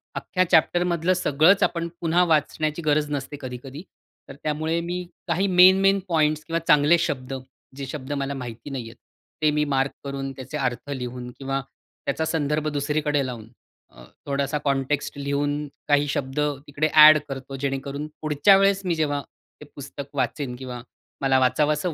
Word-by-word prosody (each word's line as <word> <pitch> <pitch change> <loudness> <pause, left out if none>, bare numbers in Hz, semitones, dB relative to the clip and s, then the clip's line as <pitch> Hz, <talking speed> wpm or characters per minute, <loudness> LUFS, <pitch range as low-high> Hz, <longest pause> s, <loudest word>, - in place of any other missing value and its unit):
अख्ख्या 185 - 0
चॅप्टर 175 +2 +4
मधलं 175 0 +1
सगळंच 175 +2 +3
आपण 170 -1 0
पुन्हा 170 +1 +3
वाचण्याची 155 0 0
गरज 150 0 +2
नसते 145 0 -4
कधी-कधी. 130 +3 -7 0.5
तर 135 - -9
त्यामुळे 155 +2 -1
मी 175 +1 -3 0.2
काही 180 +3 +1
मेन-मेन 190 +2 +6
पॉइंट्स 155 -3 +1
किंवा 165 +2 -1
चांगले 150 +3 +5
शब्द 135 -5 -3 0.4
जे 140 - -4
शब्द 130 +1 -7
मला 140 0 -2
माहिती 125 -1 -7
नाहीहेत. 120 -5 -6 0.5
ते 155 -1 +4
मी 150 0 +1
मार्क 135 0 +1
करून 135 -1 -4
त्याचे 135 +3 -7
अर्थ 125 -1 -3
लिहून 125 -2 -5
किंवा 135 0 -2 0.4
त्याचा 150 +3 -1
संदर्भ 155 -1 -1
दुसरीकडे 145 0 0
लावून, 120 -4 -7 0.4
अ, - - -16 0.2
थोडासा 140 +1 -1
कॉन्टेक्स्ट 140 +1 -1
लिहून 145 +1 -1 0.2
काही 145 0 +3
शब्द, 135 0 -2 0.3
तिकडे 145 +2 0
ॲड 155 0 +10
करतो 135 0 -6
जेणेकरून 140 +1 -3
पुढच्या 155 +6 +5
वेळेस 195 0 +3
मी 175 -2 +1
जेव्हा 145 -3 0 0.4
ते - - -9
पुस्तक 140 0 -9
वाचेन 130 0 -2
किंवा 125 -1 -7 0.4
मला 135 -1 +3
वाचावसं 150 +6 +1
145 Hz, 155 wpm, -24 LUFS, 135-155 Hz, 0.5 s, ॲड